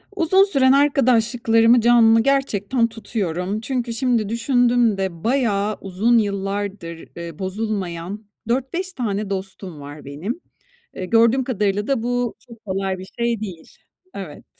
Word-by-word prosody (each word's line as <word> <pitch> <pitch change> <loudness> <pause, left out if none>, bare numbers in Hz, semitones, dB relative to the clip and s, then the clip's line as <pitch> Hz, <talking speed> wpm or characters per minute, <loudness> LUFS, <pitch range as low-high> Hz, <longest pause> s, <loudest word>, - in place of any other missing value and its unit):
Uzun 375 +2 +4
süren 275 -10 +3
arkadaşlıklarımı 240 -4 +4
canlı, 230 -1 +6
gerçekten, 255 -4 +1
tutuyorum. 200 -3 -3
Çünkü 245 -1 -2
şimdi 235 -4 0
düşündüm 235 -2 +2
de 185 -4 -4
bayağı 215 -5 +1
uzun 200 +5 +2
yıllardır, 200 -4 -3
eee, 170 -2 -8
bozulmayan 195 -1 -4 0.2
4-5 270 +10 -2
tane 210 -6 -2
dostum 190 -4 -6
var 145 +1 -10
benim. 170 - -5 0.5
Eee, 185 - -4
gördüğüm 230 +5 +4
kadarıyla 205 -4 -1
da 270 -5 0
bu 245 -1 -1
çok 230 -2 -16
kolay 190 -1 -2
bir 185 - -8
şey 235 -1 0
değil. 185 -6 -8 0.4
Evet. 185 -7 -8
220 Hz, 125 wpm, -21 LUFS, 195-245 Hz, 0.5 s, canlı